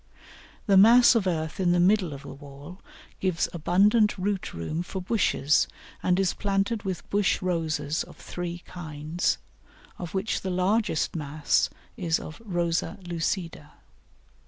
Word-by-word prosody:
The 195 -3 +4
mass 235 +6 +8
of 220 -5 +1
earth 160 -2 -2
in 175 -2 +3
the 175 - +2
middle 185 -1 +3
of 140 0 -8
the 140 - -9
wall 145 +5 -12 0.4
gives 185 -3 0
abundant 205 +7 +3
root 195 0 -2
room 85 - -4
for 190 +2 -5
bushes, 180 -7 +2 0.3
and 180 +1 +2
is 190 -2 +2
planted 200 +2 -1
with 190 -3 -5
bush 205 -1 +2
Roses 160 -4 -1
of - - -15
three 175 0 -6
kinds, 155 -1 -2 0.6
of 175 0 -6
which 195 +3 -1
the 190 - -3
largest 185 -1 0
mass 150 -1 0 0.3
is 170 -6 0
of 155 +8 -9
Rosa 175 -4 -1
lucida. 165 -3 -3
180 Hz, 140 wpm, -26 LUFS, 160-195 Hz, 0.6 s, mass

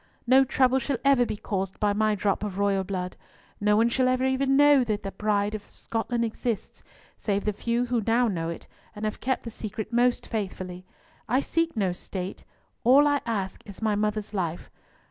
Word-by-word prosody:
No 260 +2 +6
trouble 260 0 +3
shall 265 +1 -1
ever 265 -4 +5
be - - -3
caused 195 -2 -3
by 205 -1 +2
my 215 0 +2
drop 200 -1 0
of 200 -3 -4
royal 200 -1 +2
blood; 180 -2 -4 0.4
no 210 0 +3
one 225 +1 +4
shall 255 +2 +2
ever 255 0 +2
even 270 +1 +2
know 290 -2 +6
that 205 -4 -3
Bride 210 -1 +1
of 215 -1 -7
Scotland 235 +1 -2
exists, 225 0 -4 0.4
save 200 -1 -1
the 210 - +1
few 235 +4 0
who 240 -2 0
now 235 +2 +4
know 165 -6 -2
it, 170 - -6 0.3
and 210 +1 -4
have 215 - -3
kept 260 0 -1
the 230 - -6
secret 215 +1 -6
most 245 +1 +2
faithfully. 185 -4 -5 0.4
I 255 +3 +3
seek 330 0 -1
no 190 -4 +1
state; 185 +1 -6 0.4
all 270 +5 +6
I 290 -1 +2
ask 200 -5 -2
is 200 - -10
my 220 -1 +1
mother's 210 0 -1
life. 175 -4 -3
215 Hz, 190 wpm, -26 LUFS, 200-250 Hz, 0.4 s, No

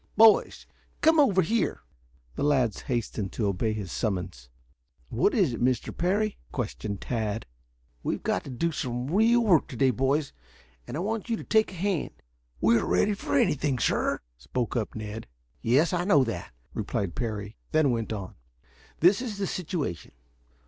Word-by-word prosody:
Boys, 220 0 +5 0.4
come 320 0 +5
over 200 -10 +5
here!" 225 +5 0 0.5
The - - -6
lads 130 -7 +2
hastened 115 -5 -2
to 110 - -1
obey 100 +3 0
his 105 -4 -4
summons. 90 - -3 0.6
"What 135 - +2
is 185 - +3
it, - - -5
Mr. 125 -1 0
Parry?" 200 +4 0
questioned 105 -4 -4
Tad. 110 -3 -2 0.6
"We've - - -2
got 90 - 0
to - - -7
do 165 +7 -1
some 125 -1 -3
real 230 +4 +5
work 180 -8 +4
to - - -8
day, 130 +2 +3
boys, 135 +4 0 0.5
and 135 - -4
I - - -2
want 220 +3 -3
you 230 - +1
to - - -7
take 220 -2 +2
a - - -9
hand." 185 - -1 0.5
"We 115 - +4
are - - -2
ready 210 - +3
for 195 - -1
anything, 140 -2 +2
sir," - - +1 0.2
spoke 105 - -3
up 115 -3 -2
Ned. 110 - -6 0.3
"Yes, 140 +10 +3
I 175 -1 +1
know 155 -8 +5
that," 115 - -4 0.2
replied 95 -4 -2
Parry; 105 -3 -4
then 155 -4 +3
went 115 -2 -2
on: 100 -4 -5 0.7
"This 185 +7 +5
is 225 -6 -4
the 200 - -1
situation. 165 - -4
135 Hz, 170 wpm, -27 LUFS, -, 0.7 s, Boys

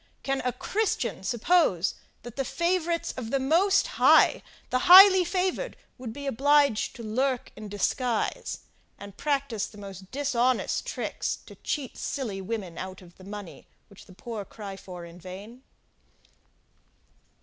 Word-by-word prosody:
Can 270 -1 -1
a 250 - 0
Christian 395 - -2
suppose, 220 - +2 0.3
that 240 0 -9
the 270 - -1
favourites 340 +5 -1
of 245 -3 -6
the 275 - +1
most 345 +9 +3
High, - - +5 0.3
the 255 - 0
highly 380 0 +10
favoured 370 +7 -2 0.2
would 245 -3 -6
be 280 +5 -8
obliged 280 -2 +2
to 235 - -9
lurk 250 +4 -1
in 215 -1 -9
disguise, 225 +3 -1 0.4
and 200 -1 -11
practise 275 -7 -1
the 210 - -15
most 195 -2 -10
dishonest 255 -3 0
tricks - - -3
to - - -12
cheat 280 -5 -4
silly 220 -9 -3
women 190 -4 -5
out 185 0 -7
of 175 -1 -17
the 185 - -14
money, 200 -2 -9 0.2
which 200 - -16
the 185 - -14
poor 220 +1 -6
cry 200 -1 -9
for 180 -2 -9
in 170 +1 -13
vain? 200 +7 -10
240 Hz, 145 wpm, -27 LUFS, 200-285 Hz, 0.4 s, highly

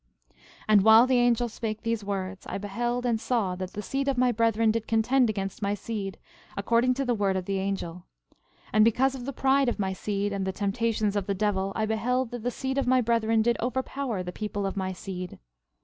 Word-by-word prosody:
12:19 - - -37 0.3
And 210 -2 +6
while 220 +2 +8
the 255 -1 +3
angel 240 0 +3
spake 220 -1 -5
these 230 -2 -1
words, 195 -1 -4
I - - -3
beheld 240 +5 -2
and 230 -2 0
saw 215 -8 0
that 185 0 -5
the 210 - -5
seed 275 +4 -2
of 275 -2 +1
my 250 0 +3
brethren 225 -1 +2
did 225 0 -3
contend 235 +3 +3
against 195 -2 -4
my 200 0 0
seed, 205 -2 -5 0.4
according 235 +5 +2
to 275 +1 -1
the 245 - +1
word 200 -3 0
of 185 - -3
the 195 0 -1
angel; 180 -3 -4 0.7
and 215 +1 +6
because 255 +4 +3
of 255 -2 -7
the 275 - -3
pride 270 0 +2
of - - -3
my 190 -2 -1
seed, 200 +1 -2
and 195 -1 -2
the 190 - -1
temptations 210 +1 -1
of 200 -2 -1
the 200 - 0
devil, 195 -1 0
I 220 - 0
beheld 240 +3 0
that 245 -1 -5
the 245 - -1
seed 265 +2 -2
of 270 - -1
my 255 0 +4
brethren 225 -2 +2
did 235 +1 +2
overpower 255 -3 -2
the 180 - -5
people 205 0 -4
of 195 - -3
my 190 -1 -2
seed. 185 -1 -7
220 Hz, 225 wpm, -27 LUFS, 200-245 Hz, 0.7 s, while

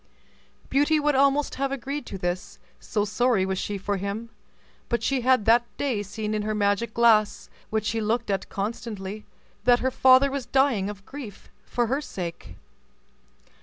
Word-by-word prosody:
Beauty 290 +3 +3
would 295 0 +2
almost 280 +2 +3
have 275 -1 0
agreed 275 +1 -4
to 195 - -6
this, 175 0 -4 0.2
so 210 -2 -1
sorry 220 -2 +2
was 190 0 -2
she 205 - -3
for 200 +1 -2
him, 200 +4 -4 0.6
but 235 - 0
she 270 -2 +1
had 255 -3 +3
that 235 +2 +5
day 260 -7 -1
seen 210 +2 -4
in 215 - 0
her 215 +1 -2
magic 210 +2 0
glass, 220 -3 +3 0.2
which 215 -1 -1
she 225 +1 -1
looked 225 +1 0
at 195 -1 -2
constantly, 210 -1 -5 0.4
that 245 -1 +6
her 260 +1 -1
father 260 +2 +5
was 270 -3 -4
dying 245 -7 +2
of 200 -1 -9
grief 270 -8 -9 0.2
for 240 - 0
her 270 +5 -1
sake. 175 - -7
225 Hz, 165 wpm, -25 LUFS, 205-260 Hz, 0.6 s, that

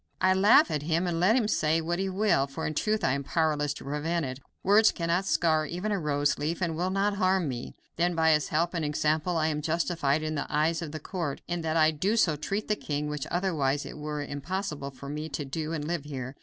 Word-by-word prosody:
I 185 0 +4
laugh 210 +11 +5
at 150 - -1
him 165 +4 0
and 170 -2 -1
let 190 +6 +4
him 240 -5 +2
say 160 -5 +2
what 170 +2 -2
he 195 0 -1
will, 190 -8 +2
for 150 +4 -5
in 155 - -2
truth 215 +7 0
I - - +3
am 140 +1 -1
powerless 150 -1 0
to - - -9
prevent 155 +4 -1
it. 130 0 -5 0.2
Words 210 +3 +5
cannot 170 +3 -1
scar 155 -4 +2
even 180 +7 -3
a 200 - 0
rose 145 -2 0
leaf, 155 +3 -2
and 170 -4 -1
will 180 +3 -1
not 200 +1 0
harm 185 -3 +2
me. 125 -3 -5 0.2
Then, 175 +1 +1
by 160 0 +4
his 150 -1 +2
help 170 +3 0
and 165 -2 -1
example 155 +3 0
I 160 0 +2
am 150 -1 -2
justified 160 -2 0
in 155 0 -2
the 145 - -4
eyes 155 +2 +1
of 160 -3 -5
the 155 - -5
court 165 -3 -4
in 175 0 -2
that 160 0 -1
I 155 0 +4 0.2
so 175 -9 +3
treat 195 +8 -3
the 210 - +1
king, 150 -5 -3
which 150 -2 -4
otherwise 155 -6 0
it - - -8
were 150 -1 -4
impossible 145 0 -4
for 140 +1 -11
me 150 +2 -4
to 145 0 -4
do 155 +3 -4
and 155 -3 -3
live 165 -2 -3
here. 130 -2 -6
160 Hz, 240 wpm, -28 LUFS, 150-180 Hz, 0.2 s, laugh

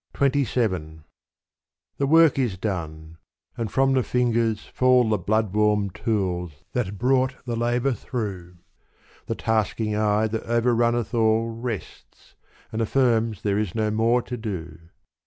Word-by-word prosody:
XXVII 115 - 0 1.0
The 140 - +1
work 160 -1 +5
is 120 -8 0
done 80 -5 -5 0.4
and 115 -4 -4
from 135 0 +3
the 130 - +3
fingers 115 -3 0
fall 125 -2 +3
The 105 -2 +1
bloodwarm 105 0 +1
tools 90 - -2
that 105 -5 -2
brought 130 +2 +2
the 120 -2 -2
labor 120 +3 +1
through 95 -7 -5 0.7
The - - -2
tasking 110 -1 -1
eye 105 0 +2
that 110 +1 -3
overrunneth 120 0 +1
all 115 0 +2
Rests, 115 -2 -7 0.4
and 110 - -2
affirms 115 -3 +1
there 100 -1 +1
is 105 -3 -3
no 110 -1 0
more 115 +3 +2
to 125 - -5
do. 90 -8 -6
110 Hz, 130 wpm, -24 LUFS, 100-120 Hz, 1.0 s, work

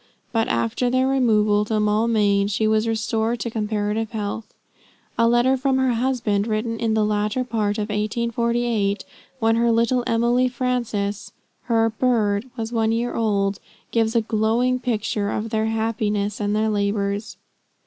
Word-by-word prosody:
But 225 -1 +1
after 115 - 0
their 255 +1 +2
removal 215 -6 +3
to 215 0 0
Maulmain, 210 -1 +2
she 210 +2 0
was 215 +1 +2
restored 225 +1 -1
to 235 - -3
comparative 215 0 -1
health. 215 +1 -4 0.6
A 230 - +3
letter 240 +3 +3
from 265 0 +1
her 260 -2 +2
husband, 230 -4 0
written 225 +1 -2
in 225 -1 0
the 215 -1 +2
latter 210 +4 0
part 215 -4 -1
of 210 0 -3
1848, 230 0 -1 0.3
when 225 -1 +2
her 235 0 +3
little 235 +2 +2
Emily 240 +2 +2
Frances, 235 -5 -2 0.3
her 225 -1 +2
"bird," 220 -1 0
was 225 +1 -4
one 225 -1 +1
year 235 +2 -1
old, 200 -3 0 0.3
gives 225 0 +1
a 230 - +4
glowing 225 +4 +1
picture 215 -4 -1
of 220 +2 -3
their 220 -1 0
happiness 215 -2 -1
and 205 0 0
their 220 +1 +1
labors. 200 0 -1
220 Hz, 150 wpm, -22 LUFS, 210-235 Hz, 0.6 s, a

